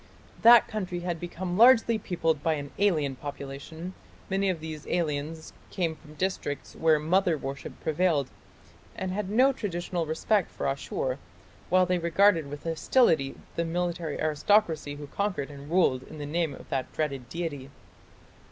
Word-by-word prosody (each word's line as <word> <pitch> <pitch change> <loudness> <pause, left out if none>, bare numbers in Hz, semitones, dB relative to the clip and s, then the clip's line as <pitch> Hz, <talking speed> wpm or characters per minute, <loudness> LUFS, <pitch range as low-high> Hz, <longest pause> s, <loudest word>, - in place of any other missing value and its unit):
That 235 0 +8
country 185 -5 -4
had 175 -2 -3
become 175 +2 -4
largely 230 -2 +6
peopled 165 -6 -1
by 160 +1 +2
an 145 -1 -6
alien 155 -9 +2
population; 145 +5 -7 0.4
many 195 0 +2
of 180 -3 -1
these 155 -1 -7
aliens 160 -1 -2 0.2
came 170 -4 -1
from 150 0 -16
districts 185 -5 -3
where 160 -1 +4
"mother 170 +2 +2
worship" 135 -1 -6
prevailed, 155 -4 +1 0.6
and 190 - -3
had 195 0 -3
no 255 +6 +4
traditional 175 -6 -3
respect 180 +5 +1
for - - -5
Ashur, 135 -1 -2 0.5
while 185 +1 +5
they 180 0 +1
regarded 170 -2 +3
with 145 0 -7
hostility 165 - +2 0.2
the 170 - 0
military 170 -2 -2
aristocracy 155 -1 +2
who 145 0 -8
conquered 175 -3 -2
and 140 0 -10
ruled 165 -7 +3
in 155 - -11
the 145 - -5
name 160 +1 -1
of - - -14
that 130 -1 -2
dreaded 135 -6 -3
deity. 145 -4 -4
165 Hz, 150 wpm, -28 LUFS, 145-185 Hz, 0.6 s, That